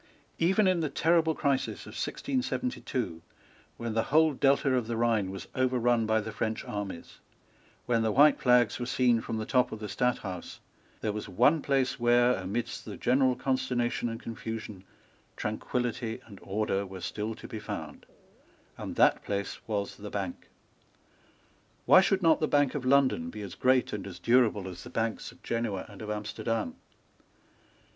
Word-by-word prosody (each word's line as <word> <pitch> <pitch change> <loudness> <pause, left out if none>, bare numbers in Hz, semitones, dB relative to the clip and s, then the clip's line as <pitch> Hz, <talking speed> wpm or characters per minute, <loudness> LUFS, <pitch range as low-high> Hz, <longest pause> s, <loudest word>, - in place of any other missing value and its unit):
Even 190 +5 +3
in 185 -2 +3
the 155 -2 -1
terrible 160 +2 +2
crisis 140 -3 0
of - - -10
1672, 250 - -2 0.6
when 115 -1 -4
the 115 0 +1
whole 160 0 +4
Delta 135 0 +3
of 125 -3 0
the 115 -1 -2
Rhine 115 -4 +1
was 95 -2 -7
overrun 120 -3 +2
by 110 0 +3
the 110 +1 -5
French 110 +1 -3
armies, 100 -4 -6 0.7
when 115 -2 +2
the 110 -1 +1
white 145 +5 +6
flags 125 -2 +4
were 120 - -3
seen 120 -2 +3
from 115 - -4
the 110 - -3
top 125 +1 +2
of - - -5
the 105 - -7
Stadthouse, 105 -7 -2 0.4
there 110 - 0
was 105 0 -5
one 125 - +4
place 135 -1 0
where, 120 +1 +4
amidst 110 +5 -3
the - - -8
general 130 0 +3
consternation 125 -2 -1
and 115 0 -5
confusion, 110 -4 -6 0.5
tranquillity 120 +1 -2
and 100 -4 -13
order 100 0 -1
were 95 -1 -9
still 105 +5 -3
to - - -10
be 110 - -6
found; - - -7 0.7
and - - -5
that - - +4
place 100 0 -3
was 105 -2 -2
the 105 0 -7
Bank. 95 -4 -5 1.4
Why 185 - +8
should 190 0 +1
not 165 -1 +5
the 155 - +1
Bank 145 -3 +2
of 140 -3 -4
London 130 -11 +3
be 105 +4 -7
as 100 - -7
great 130 0 +2
and 100 -2 -4
as 90 -2 -8
durable 110 -1 +3
as 90 -1 -8
the 120 - -9
Banks 115 -3 -2
of 125 +1 -21
Genoa 115 -5 -2
and - - -12
of 105 - -6
Amsterdam? 105 -2 -2
115 Hz, 165 wpm, -29 LUFS, 105-130 Hz, 1.4 s, Why